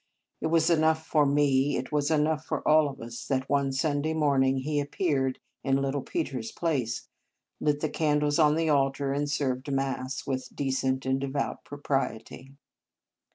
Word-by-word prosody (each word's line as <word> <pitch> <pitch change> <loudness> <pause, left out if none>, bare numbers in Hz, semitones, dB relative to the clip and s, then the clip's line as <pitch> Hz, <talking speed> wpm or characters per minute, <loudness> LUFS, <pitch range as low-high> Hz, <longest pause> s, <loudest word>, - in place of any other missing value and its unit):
It - - 0
was 165 +1 +3
enough 160 -1 +2
for 150 -3 +3
me 140 -1 +2
it 130 - -5
was 150 -1 +1
enough 155 0 +1
for - - -3
all 155 -1 +5
of 135 0 -10
us 115 +1 -7
that 130 0 -1
one 140 -1 +1
Sunday 145 +3 0
morning 135 -3 +2
he 145 +3 -1
appeared 140 -3 0 0.3
in 135 0 +2
little 135 +1 -1
Peter 140 -2 -3
s 110 0 -6
place, 130 -9 -2 0.5
lit 150 -1 0
the 155 - +1
candles 150 -1 +1
on 150 -1 +5
the 165 0 0
altar, 135 -1 +1
and 145 +1 -1
served 135 -1 -1
Mass 135 -1 -2
with 130 -1 -4
decent 130 -1 -1
and 130 +1 0
devout 140 0 -3
propriety. 135 -2 -4
140 Hz, 165 wpm, -28 LUFS, 135-150 Hz, 0.5 s, all